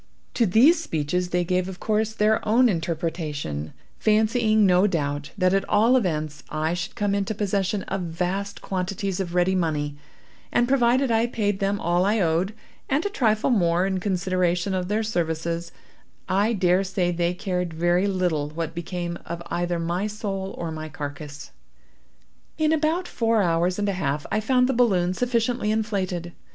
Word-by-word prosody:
To 230 Hz, -, +2 dB
these 275 Hz, -, +5 dB
speeches 175 Hz, -, -1 dB
they 180 Hz, 0 st, +1 dB
gave, 180 Hz, +1 st, 0 dB
of 190 Hz, -, -8 dB
course, 215 Hz, 0 st, 0 dB
their 215 Hz, 0 st, +2 dB
own 240 Hz, +3 st, +5 dB
interpretation; 160 Hz, -, -3 dB, 0.3 s
fancying, 215 Hz, 0 st, +3 dB
no 185 Hz, +1 st, +4 dB
doubt, 145 Hz, -5 st, -2 dB
that 185 Hz, -1 st, +3 dB
at 195 Hz, 0 st, +2 dB
all 225 Hz, +5 st, +4 dB
events 155 Hz, -, -1 dB
I 155 Hz, +2 st, -1 dB
should 175 Hz, 0 st, -4 dB
come 205 Hz, -1 st, 0 dB
into 200 Hz, +1 st, -1 dB
possession 200 Hz, -1 st, -1 dB
of 195 Hz, 0 st, -3 dB
vast 180 Hz, +4 st, -3 dB
quantities 190 Hz, 0 st, -2 dB
of 180 Hz, -2 st, -3 dB
ready 180 Hz, +1 st, +3 dB
money; 150 Hz, -5 st, -1 dB, 0.5 s
and 240 Hz, -, +2 dB
provided 255 Hz, 0 st, +3 dB
I 225 Hz, +1 st, +3 dB
paid 205 Hz, -4 st, -1 dB
them 200 Hz, +1 st, 0 dB
all 175 Hz, +2 st, +1 dB
I 210 Hz, +3 st, +2 dB
owed, 175 Hz, +3 st, +1 dB, 0.3 s
and 285 Hz, +6 st, +1 dB
a -, -, +1 dB
trifle 220 Hz, -, +1 dB
more, 175 Hz, -4 st, +2 dB
in 190 Hz, -1 st, -1 dB
consideration 185 Hz, -1 st, 0 dB
of 180 Hz, -1 st, -1 dB
their 215 Hz, +3 st, 0 dB
services, 170 Hz, -4 st, -2 dB, 0.6 s
I 205 Hz, +5 st, +2 dB
dare 185 Hz, -2 st, +3 dB
say 185 Hz, -2 st, 0 dB
they 175 Hz, 0 st, 0 dB
cared 180 Hz, -2 st, -2 dB
very 175 Hz, +4 st, +1 dB
little 175 Hz, -7 st, 0 dB
what 165 Hz, +1 st, -4 dB
became 170 Hz, 0 st, -4 dB
of 170 Hz, 0 st, -5 dB
either 175 Hz, 0 st, -1 dB
my 175 Hz, +4 st, -1 dB
soul 195 Hz, -2 st, -4 dB
or 170 Hz, -1 st, -4 dB
my 155 Hz, 0 st, -6 dB
carcass. 145 Hz, 0 st, -7 dB, 1.1 s
"In 315 Hz, 0 st, +2 dB
about 320 Hz, +3 st, 0 dB
four 225 Hz, -2 st, +1 dB
hours 175 Hz, +1 st, +1 dB
and 205 Hz, 0 st, 0 dB
a 200 Hz, -, +1 dB
half 150 Hz, -5 st, -2 dB
I 215 Hz, -, +2 dB
found 250 Hz, +3 st, +2 dB
the 265 Hz, -, +1 dB
balloon 190 Hz, -8 st, +2 dB
sufficiently 240 Hz, 0 st, 0 dB
inflated. 190 Hz, -6 st, -2 dB
185 Hz, 165 wpm, -24 LUFS, 170-215 Hz, 1.1 s, these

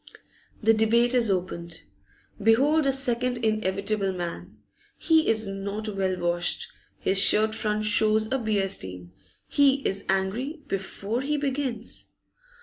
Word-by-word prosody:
The 225 Hz, +1 st, +5 dB
debate 230 Hz, +3 st, +3 dB
is 240 Hz, -3 st, +2 dB
opened. 170 Hz, -3 st, -3 dB, 0.6 s
Behold 275 Hz, +8 st, +3 dB
a -, -, +4 dB
second 250 Hz, -2 st, 0 dB
inevitable 200 Hz, -1 st, 0 dB
man; 175 Hz, -2 st, -6 dB, 0.4 s
he 320 Hz, -1 st, +2 dB
is 220 Hz, -1 st, +2 dB
not 200 Hz, +2 st, -4 dB
well 190 Hz, -2 st, -1 dB
washed, 175 Hz, 0 st, 0 dB, 0.3 s
his 190 Hz, +1 st, +1 dB
shirt 215 Hz, +2 st, +5 dB
front 215 Hz, -1 st, -2 dB
shows 215 Hz, 0 st, +3 dB
a 265 Hz, -, +1 dB
beer 210 Hz, -4 st, 0 dB
stain; 90 Hz, -, -4 dB, 0.4 s
he 275 Hz, -1 st, +3 dB
is 195 Hz, +1 st, -2 dB
angry 230 Hz, -, -2 dB
before 200 Hz, +4 st, -3 dB
he 295 Hz, +2 st, -1 dB
begins. 270 Hz, -5 st, -3 dB
215 Hz, 130 wpm, -26 LUFS, 195-245 Hz, 0.6 s, The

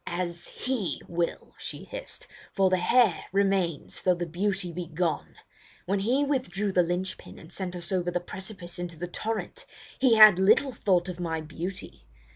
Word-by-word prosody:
"As 175 Hz, -1 st, -3 dB
he 225 Hz, -, -2 dB
will," 170 Hz, 0 st, -2 dB
she -, -, -6 dB
hissed; -, -, -6 dB, 0.3 s
"for 190 Hz, -1 st, +3 dB
the 185 Hz, -, +4 dB
hair 225 Hz, +1 st, +3 dB
remains 195 Hz, -5 st, 0 dB
though 180 Hz, -1 st, +3 dB
the 175 Hz, 0 st, -3 dB
beauty 185 Hz, +2 st, -1 dB
be 175 Hz, 0 st, -5 dB
gone. 165 Hz, +1 st, -2 dB, 0.5 s
When 195 Hz, +2 st, 0 dB
he 245 Hz, +8 st, +2 dB
withdrew 210 Hz, -8 st, -1 dB
the 185 Hz, -, +4 dB
lynch 180 Hz, +2 st, -2 dB
pin -, -, -12 dB
and 165 Hz, +2 st, -13 dB
sent 185 Hz, -2 st, -4 dB
us 175 Hz, 0 st, -4 dB
over 180 Hz, -2 st, +1 dB
the 175 Hz, -, 0 dB
precipice 190 Hz, -1 st, -6 dB
into 175 Hz, -2 st, -5 dB
the 175 Hz, +2 st, -4 dB
torrent, 225 Hz, -, -4 dB, 0.3 s
he 255 Hz, -4 st, +5 dB
had 215 Hz, -4 st, +9 dB
little 215 Hz, +8 st, +4 dB
thought 185 Hz, -6 st, +1 dB
of 180 Hz, -1 st, -6 dB
my 165 Hz, -2 st, -2 dB
beauty. 165 Hz, +4 st, -7 dB
185 Hz, 175 wpm, -28 LUFS, 175-205 Hz, 0.5 s, had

